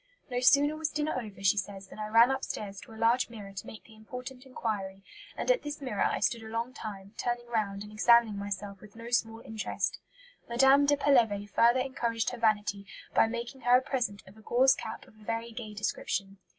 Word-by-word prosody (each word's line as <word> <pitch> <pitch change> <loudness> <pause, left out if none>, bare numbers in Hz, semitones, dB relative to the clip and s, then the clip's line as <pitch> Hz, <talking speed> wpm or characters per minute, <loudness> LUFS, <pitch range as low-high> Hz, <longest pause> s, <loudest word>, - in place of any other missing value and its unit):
"No 245 - 0
sooner 285 +4 +5
was 310 -1 -2
dinner 300 +1 -1
over," 200 -4 -10
she 195 +1 +4
says, 195 -1 -4
"than - - -11
I 215 - -3
ran 230 +4 +6
upstairs 210 -7 -4
to - - -13
a 220 - -11
large 230 +3 +3
mirror 205 -4 -9
to 190 - -7
make 220 - -10
the 225 - -17
important 250 +4 -9
inquiry, 195 -6 -4 0.3
and - - +2
at - - +2
this 295 0 -5
mirror 250 -8 -3
I - - 0
stood 230 +2 +1
a 220 - -9
long 230 +3 -3
time, 200 -3 -8
turning 240 0 -1
round 205 -4 -1
and 210 - -11
examining 230 0 +5
myself 200 -1 -5
with 210 0 -15
no 230 +1 -9
small 225 -2 0
interest." 220 -4 -3 0.5
Madame 270 +4 +5
de 290 0 +4
Pelevé 230 -8 +3
further 235 +5 +4
encouraged 235 -4 -1
her 245 - -7
vanity 205 -3 +1 0.3
by - - +5
making 235 +3 -5
her 245 +1 +6
a - - 0
present 240 -8 -2
of 190 +2 -15
"a - - -15
gauze 260 +4 +4
cap 220 - -7
of - - -19
a - - -16
very 230 +2 -3
gay 220 -2 -7
description." 195 -1 -3
230 Hz, 215 wpm, -30 LUFS, 205-250 Hz, 0.5 s, ran